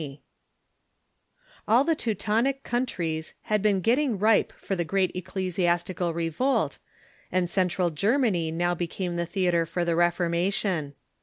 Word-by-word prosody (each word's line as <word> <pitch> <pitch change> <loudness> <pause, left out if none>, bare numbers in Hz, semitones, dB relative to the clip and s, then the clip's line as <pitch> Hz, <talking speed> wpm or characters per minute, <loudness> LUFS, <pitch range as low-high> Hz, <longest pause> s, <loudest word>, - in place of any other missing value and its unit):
] - - -34
All 235 +5 +5
the 325 +2 +2
Teutonic 230 - 0
countries 170 -10 -2
had 210 -1 0
been 200 -2 +2
getting 245 - +2
ripe 215 +2 +3
for 195 - -4
the 175 - 0
great 185 +1 +1
ecclesia.stical 180 -1 -1
revolt, 170 - 0 0.5
and 180 -1 +1
Central 180 -1 +1
Germany 200 - +1
now 175 +2 0
became 175 +1 -3
the 170 0 -2
theatre 175 -2 +1
for 175 +2 -2
the 170 -1 +1
Reformation. 175 -2 0
185 Hz, 130 wpm, -26 LUFS, 170-215 Hz, 0.5 s, All